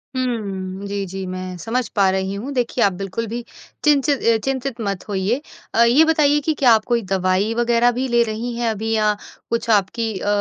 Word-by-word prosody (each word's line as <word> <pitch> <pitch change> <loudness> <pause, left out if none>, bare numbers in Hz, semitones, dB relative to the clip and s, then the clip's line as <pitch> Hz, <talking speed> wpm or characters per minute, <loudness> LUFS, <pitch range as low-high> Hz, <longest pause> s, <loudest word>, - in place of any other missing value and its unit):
हुँ। 200 -6 -3
जी, 200 0 -3
जी 190 +1 -6
मैं 185 0 -5
समझ 230 +6 -2
पा 200 -2 +4
रही 190 0 -1
हूँ 235 +8 -5
देखिए 245 -1 0
आप 200 - +3
बिल्कुल 195 +5 -4
भी 235 +3 -4 0.4
चिनचि 295 -1 +4 0.2
अ, - - +2
चिंतित 265 -2 -2
मत 200 -3 -3
होइए। 205 +7 0 0.3
अ, 230 - +5
ये 250 +7 +5
बताइए 300 -2 +3
कि 315 - +2
क्या 255 -4 +6
आप 220 -1 +2
कोई 240 -1 +1
दवाई 190 +3 +1
वगैरह 240 0 +3
भी 255 +2 -2
ले 240 -1 +3
रही 230 +2 -4
हैं 235 -1 0
अभी 220 +1 -2
या 215 -1 +3 0.4
कुछ 230 0 -2
आपकी 220 +2 +1
अ, - - -5
225 Hz, 200 wpm, -20 LUFS, 195-245 Hz, 0.4 s, क्या